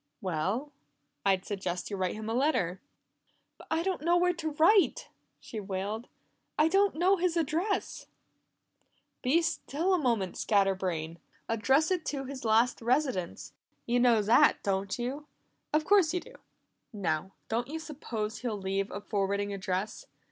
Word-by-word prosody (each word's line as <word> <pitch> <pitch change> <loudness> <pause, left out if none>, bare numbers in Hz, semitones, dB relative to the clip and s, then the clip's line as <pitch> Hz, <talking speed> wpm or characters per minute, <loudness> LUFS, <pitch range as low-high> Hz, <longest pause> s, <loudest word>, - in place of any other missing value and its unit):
"Well, 190 - -2 0.5
I'd 190 -2 +2
suggest 185 -2 -4
you - - -1
write 185 -2 -1
him 215 0 -6
a 225 - -1
letter." 240 - +1 0.8
"But - - -14
I 320 +1 +1
don't 375 -3 -1
know 340 +3 +3
where 360 0 +3
to 320 -2 -3
write!" 360 +7 +4 0.3
she 220 - -7
wailed. 205 +4 -4 0.5
"I 310 +1 +4
don't 390 +1 +3
know 370 +4 +3
his 350 -1 0
address!" 335 +6 -1 1.1
"Be 305 +7 +3
still 330 +2 -1
a 365 - +3
moment, 230 - 0
scatter 195 -2 +3
brain! 170 -3 -3 0.3
Address 265 - +2
it 360 -3 +1
to 275 -2 -2
his 265 0 -7
last 230 +3 +3
residence; 245 - -1 0.3
you 240 +1 +2
know 235 -3 +4
that, 225 +4 +5
don't 195 0 -1
you? 265 +5 -4 0.4
Of 305 +1 +2
course 370 -4 +4
you - - +1
do. - - -14 0.6
Now, 190 -4 -2
don't 235 +2 -1
you 310 +3 -4
suppose 240 -9 -5
he'll 235 -4 -3
leave 195 0 -2
a 200 - -6
forwarding 200 0 -1
address? 195 - -3
235 Hz, 155 wpm, -30 LUFS, 195-315 Hz, 1.1 s, that